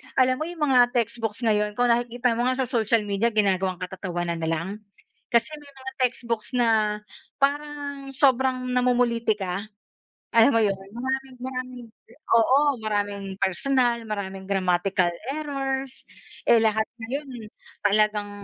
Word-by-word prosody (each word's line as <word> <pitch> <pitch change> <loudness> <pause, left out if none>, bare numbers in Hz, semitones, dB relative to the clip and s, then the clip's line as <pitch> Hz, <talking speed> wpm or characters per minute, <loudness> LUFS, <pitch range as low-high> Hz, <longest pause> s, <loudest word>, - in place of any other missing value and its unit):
alam 255 -1 +4
mo 310 - -2
yung 345 -3 -8
mga 245 -1 +5
textbooks 230 -2 -1
ngayon, 210 -2 +1
kung 245 +1 +2
nakikita 240 +1 +1
mo 240 - +1
nga 255 +1 +1
sa - - -4
social 230 -2 +2
media 205 +2 0
ginagawang 190 -3 +1
katatawanan 175 -2 -3
na 160 - -2
lang. 165 +1 -1 0.7
Kasi 235 +4 +3
may 290 -1 -15
mga 265 0 -8
textbooks 235 -2 -1
na 220 -3 +2 0.4
parang 285 -1 -2
sobrang 260 -2 +2
namumulitika, 235 -6 +1 0.7
alam 230 +4 +7
mo 230 - +4
'yon? 210 - +3
Yung 195 +5 -10
maraming 265 -1 -3
maraming 255 -1 -5 0.5
oo. 260 +5 +5 0.2
Maraming 205 -2 -2 0.2
personal, 240 +4 +1
maraming 195 -2 -5
grammatical 185 -1 +1 0.2
errors. 270 -3 -3 0.5
Eh, 230 - +7
lahat 220 0 +2 0.2
ngayon 245 -2 -6 0.4
talagang 210 0 +2
235 Hz, 135 wpm, -25 LUFS, 205-260 Hz, 0.7 s, alam